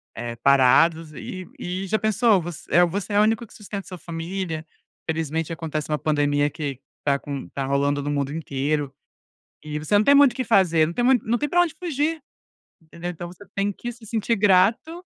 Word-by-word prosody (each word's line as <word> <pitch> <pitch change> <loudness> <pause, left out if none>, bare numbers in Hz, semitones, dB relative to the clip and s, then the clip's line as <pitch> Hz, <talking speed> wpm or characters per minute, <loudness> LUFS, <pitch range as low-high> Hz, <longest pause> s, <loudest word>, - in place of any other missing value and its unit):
eh, 120 0 -5
parados. 150 +5 +4
E 185 +3 -7
e 185 +2 -4
já 215 +3 +1
pensou, 215 -2 +3
voc 170 +1 -5 0.2
eh, 175 +4 +5
você 200 +4 -4
é 205 - +4
o 210 - +6
único 225 +2 +1
que - - -19
sustenta 200 -2 -7
sua 180 - -8
família, 165 -1 -5 0.4
infelizmente 160 0 -2
acontece 155 -2 -4
uma 150 - 0
pandemia 145 -1 +1
que 145 -4 -5 0.2
tá 140 -1 +2
con 140 -2 -6
tá 135 -1 -4
rolando 140 +1 +1
no 145 - -3
mundo 140 -1 -1
inteiro 145 -2 -2 0.7
e 150 0 -4
você 155 +7 +2
não 210 - +4
tem 280 +4 +6
muito 280 -3 +7
o - - -22
que 260 - -1
fazer, 170 -7 +4
não 170 - -5
tem 240 - -1
mui 260 0 +5
não 235 +2 +1
tem 295 +2 -2
pra 350 - +4
onde 345 -3 -1
fugir, 315 -2 -1 0.6
entendeu. 170 +2 -7
Então 175 0 -7
você 200 +3 -14
tem 200 +1 0
que 240 +5 -6
se 225 -1 -15
sentir 230 +1 0
grato. 215 - +2
170 Hz, 205 wpm, -23 LUFS, 150-215 Hz, 0.7 s, muito